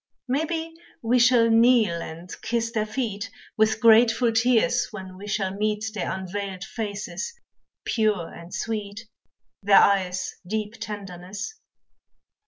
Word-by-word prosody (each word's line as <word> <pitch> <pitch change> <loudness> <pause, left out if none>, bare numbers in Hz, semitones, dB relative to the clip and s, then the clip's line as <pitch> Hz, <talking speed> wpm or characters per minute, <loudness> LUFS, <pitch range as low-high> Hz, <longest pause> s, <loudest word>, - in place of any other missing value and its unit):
Maybe 320 +5 -1 0.3
we 240 +2 +3
shall 235 -1 +5
kneel 225 -7 +4
and 165 +3 -8
kiss 230 0 -1
their 215 -2 -1
feet, 215 -3 -3 0.3
With 220 0 +2
grateful 230 +1 +5
tears, 245 +1 +3
when 190 -4 -9
we 200 +2 -9
shall 195 -2 -1
meet 210 +2 -1
Their 200 -5 -2
unveiled 190 0 -5
faces, 215 - -5 0.5
pure 210 -7 0
and 170 +1 -11
sweet, 215 0 -4 0.5
Their 200 0 +5
eyes' 185 -2 +2
deep 215 +1 -2
tenderness. 205 - -6
215 Hz, 120 wpm, -25 LUFS, 195-230 Hz, 0.5 s, shall